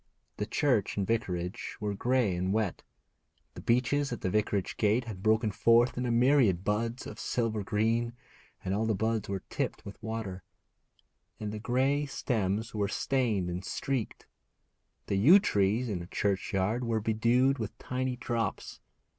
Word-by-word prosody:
The 105 - -2
church 120 -5 +1
and 100 - +1
vicarage 95 -5 -2
were 105 -1 -2
grey 120 -2 +1
and 90 +2 -1
wet. 105 -3 0 0.7
The - - -9
beeches 130 +4 +1
at 120 - -4
the 90 - -1
vicarage 105 -2 0
gate 110 +3 +2
had 110 -5 -7
broken 110 +1 +2
forth 115 +4 +4
in 125 0 -2
a - - 0
myriad 120 -7 +4
buds 115 +4 -1
of - - -8
silver 110 -4 -1
green, 115 +4 0 0.5
and 95 - 0
all 110 +2 0
the 110 - +1
buds 110 0 -1
were 100 -1 -3
tipped - - -3
with 100 - -10
water, 110 -4 -4 1.0
and 105 -1 -4
the 105 - -5
grey 135 +5 +1
stems 110 -5 -1
were 105 -2 0
stained 115 -7 0
and 90 +1 -4
streaked. 130 0 -3 0.8
The 100 - -1
yew 145 - +8
trees 110 - +1
in 100 -5 -2
the 85 - -8
churchyard 100 +4 0
were 115 -2 0
bedewed 120 +5 +2
with 110 -3 -5
tiny 130 0 -2
drops. 120 -2 -3
110 Hz, 160 wpm, -30 LUFS, 100-120 Hz, 1.0 s, yew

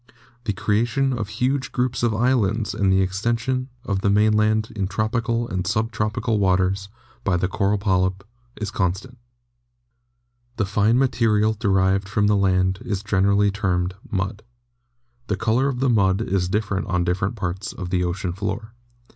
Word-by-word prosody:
The 105 - 0
creation 115 +7 +1
of 110 -5 -3
huge 130 +4 -1
groups 125 -1 -1
of 120 -1 +2
islands 110 -2 +1
and 100 -3 +1
the 95 0 +4
extension 115 +7 -1 0.2
of 100 -2 -1
the 100 - +2
mainland 110 +1 +2
in 100 -3 -1
tropical 115 +4 -1
and 90 -2 -3
sub 110 +3 0
tropical 105 +1 -1
waters 95 +1 +1 0.3
by 95 -3 +1
the 95 - 0
coral 100 +2 0
polyp 95 -1 0 0.4
is 105 -2 -3
constant 105 +5 -2 1.4
The 110 - 0
fine 105 +4 +2
material 110 -5 +2
derived 95 -2 +1
from 105 +1 +1
the 105 0 +3
land 95 -1 +2
is 100 -1 -3
generally 100 0 +2
termed 90 -3 -1 0.2
"mud." 95 +2 -2 0.9
The - - -1
color 115 +4 +1
of 130 -2 -2
the 135 - +3
mud 95 -4 +3
is 95 -5 0
different 100 -1 -1
on 90 -1 +1
different 95 +4 -1
parts 95 +1 -4
of 90 -2 -7
the 90 -1 +1
ocean 90 0 -2
floor. 110 +3 -4
105 Hz, 155 wpm, -23 LUFS, 95-115 Hz, 1.4 s, the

